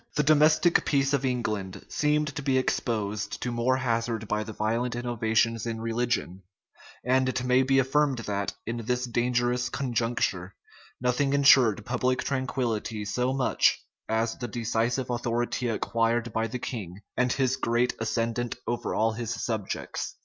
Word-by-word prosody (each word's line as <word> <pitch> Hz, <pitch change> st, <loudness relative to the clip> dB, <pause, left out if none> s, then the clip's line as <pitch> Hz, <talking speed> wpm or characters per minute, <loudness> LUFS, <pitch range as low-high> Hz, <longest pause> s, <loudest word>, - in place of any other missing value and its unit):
The 150 Hz, -, +2 dB
domestic 155 Hz, +3 st, +4 dB
peace 140 Hz, -1 st, +1 dB
of 140 Hz, -1 st, +1 dB
England 110 Hz, -7 st, -2 dB
seemed 150 Hz, 0 st, +1 dB
to -, -, -3 dB
be 135 Hz, -2 st, +1 dB
exposed 105 Hz, -5 st, -1 dB
to 125 Hz, -, -2 dB
more 120 Hz, +2 st, +1 dB
hazard 115 Hz, -3 st, -1 dB
by 105 Hz, +1 st, 0 dB
the 110 Hz, -, -7 dB
violent 115 Hz, +3 st, -1 dB
innovations 115 Hz, -1 st, 0 dB
in 115 Hz, -1 st, -3 dB
religion; 115 Hz, -4 st, -1 dB, 0.6 s
and 130 Hz, +1 st, +3 dB
it 130 Hz, -1 st, -2 dB
may 125 Hz, +1 st, +4 dB
be 135 Hz, +1 st, +2 dB
affirmed 135 Hz, +1 st, +2 dB
that, 100 Hz, -1 st, -2 dB
in 115 Hz, +2 st, -3 dB
this 125 Hz, +2 st, -1 dB
dangerous 120 Hz, +1 st, 0 dB
conjuncture, 115 Hz, -8 st, -1 dB, 0.4 s
nothing 125 Hz, +3 st, +1 dB
insured 130 Hz, -7 st, +5 dB
public 125 Hz, +1 st, 0 dB
tranquillity 120 Hz, -5 st, -2 dB
so 125 Hz, +5 st, 0 dB
much 130 Hz, -1 st, +2 dB, 0.3 s
as 110 Hz, +1 st, 0 dB
the 120 Hz, -, -3 dB
decisive 120 Hz, +2 st, -1 dB
authority 120 Hz, +1 st, -1 dB
acquired 115 Hz, +1 st, 0 dB
by 110 Hz, 0 st, 0 dB
the 120 Hz, +3 st, -4 dB
king, 100 Hz, -7 st, -6 dB
and 125 Hz, +1 st, +2 dB
his 130 Hz, -1 st, +1 dB
great 120 Hz, +1 st, +1 dB
ascendant 115 Hz, +1 st, -1 dB
over 120 Hz, 0 st, -2 dB
all 110 Hz, +1 st, +2 dB
his 115 Hz, 0 st, -4 dB
subjects. 110 Hz, -4 st, -3 dB
120 Hz, 150 wpm, -27 LUFS, 115-130 Hz, 0.6 s, insured